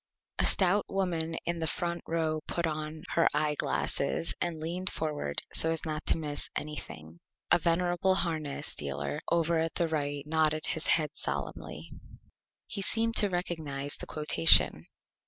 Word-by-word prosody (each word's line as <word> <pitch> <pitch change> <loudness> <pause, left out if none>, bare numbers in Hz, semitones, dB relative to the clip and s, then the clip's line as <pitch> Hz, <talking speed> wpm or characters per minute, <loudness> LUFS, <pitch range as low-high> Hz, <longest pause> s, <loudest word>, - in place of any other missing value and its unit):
A - - +4
Stout 195 +2 +3
Woman 170 -4 0
in 170 0 -2
the 160 - -1
Front 170 +2 -2
Row 160 -1 0
put 170 - -1
on 155 0 -4
her 165 - +3
Eye 150 0 +1
Glasses 145 +1 -1
and 170 -2 -1
leaned 175 +4 -3
forward 150 - -3
so 160 - +6
as 165 -1 -1
not 155 -1 -3
to - - +3
miss 150 -2 -4
Anything. 85 - -6 0.3
A 175 - +6
Venerable 175 +2 +2
Harness 155 -6 -1
Dealer 70 0 -4
over 170 -1 +2
at 165 -1 -1
the 170 - +2
Right 145 -2 -2
nodded 155 0 +1
his 160 - +1
Head 155 -2 +3
solemnly. - - -4 0.7
He 200 - -5
seemed 230 +3 +1
to 205 - +5
recognize 155 -6 -3
the - - -8
Quotation. 150 - +4
160 Hz, 155 wpm, -30 LUFS, 150-170 Hz, 0.7 s, so